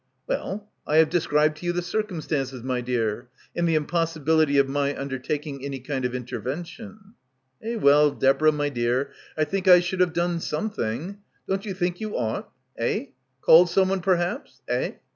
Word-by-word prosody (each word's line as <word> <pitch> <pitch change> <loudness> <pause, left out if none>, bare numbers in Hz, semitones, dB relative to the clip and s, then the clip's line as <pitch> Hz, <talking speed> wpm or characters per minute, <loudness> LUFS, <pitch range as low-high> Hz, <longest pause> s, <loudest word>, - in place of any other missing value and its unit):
"Well, 210 - -3 0.2
I 150 - +1
have 160 -1 +5
described 155 -3 +2
to 175 - -6
you 175 - +1
the 175 0 -2
circum 185 -1 -2
stances, 135 -5 -3
my 130 -1 -1
dear, 120 -1 -2 0.3
and 170 0 +1
the 165 - +2
impossibility 160 -2 +1
of 140 -1 +4
my 140 +1 -1
un 140 0 -4
dertaking 140 +1 -4
any 140 -1 -4
kind 130 0 -3
of 125 0 -2
intervention." 175 - -6 0.5
"Eh, 230 +2 -3
well, 150 -6 +5
Deborah 140 +3 +3
my 145 -1 -1
dear, 125 +1 -1 0.3
I 155 - +3
think 190 +5 -2
I 180 -1 +9
should 180 +1 -3
have 180 -2 +3
done 170 0 0
something. 165 - -3 0.3
Don't 195 +2 -2
you 195 - -3
think 180 0 -2
you 215 -1 -3
ought? 115 -2 -2 0.3
Eh? 115 +4 -1 0.3
Called 175 +2 +7
someone 190 +1 +2
perhaps 180 - -1
— - - -47
eh? - - -1
155 Hz, 180 wpm, -25 LUFS, 135-180 Hz, 0.5 s, I